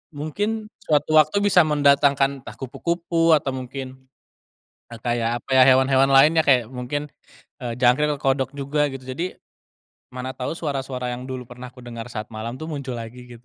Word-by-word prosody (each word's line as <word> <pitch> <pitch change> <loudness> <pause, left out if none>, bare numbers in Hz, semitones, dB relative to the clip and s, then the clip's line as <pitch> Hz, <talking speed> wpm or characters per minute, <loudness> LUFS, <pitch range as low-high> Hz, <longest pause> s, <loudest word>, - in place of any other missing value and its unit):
mungkin 210 +9 -3
suatu 150 0 0
waktu 200 +7 +2
bisa 180 -5 +5
mendatangkan, 140 -2 +3
entah 105 -3 -11
kupu-kupu 165 +5 +1
atau 140 -2 -1
mungkin, 130 0 -7 0.9
eee, 115 -1 -11
kayak 120 -1 -1
apa - - -23
ya, - - +8
hewan-hewan 130 +1 +4
lainnya, 145 +4 +5
kayak 125 -3 +3
mungkin, 140 +4 -4 0.5
eee, 120 -2 -4
jangkrik 130 +4 +3
atau - - -15
kodok 135 0 -2
juga 145 +1 0
gitu. 135 -1 -8
Jadi, 150 +8 -4 0.7
mana 130 +1 -6
tau 130 +5 -5
suara-suara 135 -5 -3
yang 125 +2 -7
dulu 130 -1 -5
pernah 125 +1 -10
kudengar 120 -2 -9
saat 110 -2 -5
malam 115 +3 -5
tuh, - - -7
muncul 140 -6 -5
lagi 120 +2 -9
gitu. 120 - -29
135 Hz, 165 wpm, -23 LUFS, 125-150 Hz, 0.9 s, ya